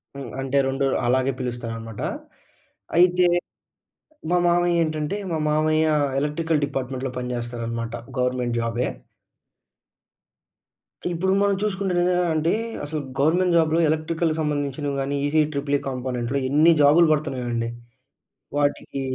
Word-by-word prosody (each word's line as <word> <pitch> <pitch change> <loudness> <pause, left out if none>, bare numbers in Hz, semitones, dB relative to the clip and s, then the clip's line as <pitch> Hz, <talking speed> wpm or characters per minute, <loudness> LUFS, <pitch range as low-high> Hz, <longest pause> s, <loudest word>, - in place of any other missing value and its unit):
హ్మ్. 135 -3 -7
అంటే 135 +1 -1
2 135 +1 0 0.2
అలాగే 130 +2 +2
పిలుస్తారనమాట. 115 -3 -5 1.0
అయితే 180 0 +5 1.1
మా 180 - +4
మామయ్య 175 0 +3
ఏంటంటే, 155 +3 -2 0.2
మా 160 - 0
మామయ్య 155 +1 +2 0.3
ఎలక్ట్రికల్ 150 +1 0
డిపార్ట్మెంట్‌లో 135 -1 -4
పనిజేస్తారనమాట. 120 -2 -4 0.3
గవర్నమెంట్ 125 -1 0
జా‌‌బె. 115 +2 -1 2.3
ఇప్పుడు 190 +3 0
మనం 200 -1 +3
చూసుకున్నటలైతే 185 -3 +1 0.2
ఆంటే 160 +2 +1 0.3
అసలు 155 +1 -3 0.2
గవర్నమెంట్ 170 +4 +3
జాబ్‌లో 160 0 +3
ఎలక్ట్రికల్‌కి 160 +1 0
సంబంధించినవి 145 -1 -2
గాని 140 +1 -2
ఈసీ 155 +2 +3
ట్రిపుల్ 140 0 0
ఈ - - -13
కాంపోనెంట్‌లో 125 0 -2
ఎన్ని 155 +4 +5
జాబ్‌లు 160 +4 +6
పడుతున్నాయో 140 -5 -2
అండి. 115 0 -1 0.9
వాటికీ 145 -1 -1
145 Hz, 110 wpm, -23 LUFS, 125-165 Hz, 2.3 s, జాబ్‌లు